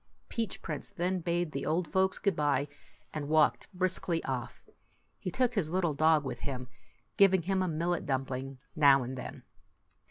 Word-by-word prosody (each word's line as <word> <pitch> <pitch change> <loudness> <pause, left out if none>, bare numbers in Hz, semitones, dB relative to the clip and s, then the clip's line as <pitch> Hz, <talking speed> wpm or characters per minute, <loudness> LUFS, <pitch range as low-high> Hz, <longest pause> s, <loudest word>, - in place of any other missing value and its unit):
Peach 230 -2 -3
Prince - - -4
then 185 -1 -1
bade 170 -1 -1
the 140 - -3
old 165 +2 0
folks 190 0 +2
good 200 - +1
by, 145 -1 +1 0.5
and 150 -2 -4
walked 155 +5 +3
briskly 180 -2 -1
off. 130 -3 -5 0.5
He - - -3
took 250 +6 +1
his 195 -9 0
little 175 -2 +1
dog 155 0 +4
with 135 - -4
him, 130 -3 -5 0.5
giving 190 -3 +5
him 190 +2 +1
a 185 - +1
millet 170 +2 -1
dumpling 135 0 -2 0.2
now 140 -3 +6
and 130 +2 -5
then. 125 - -7
160 Hz, 165 wpm, -31 LUFS, 140-185 Hz, 0.5 s, now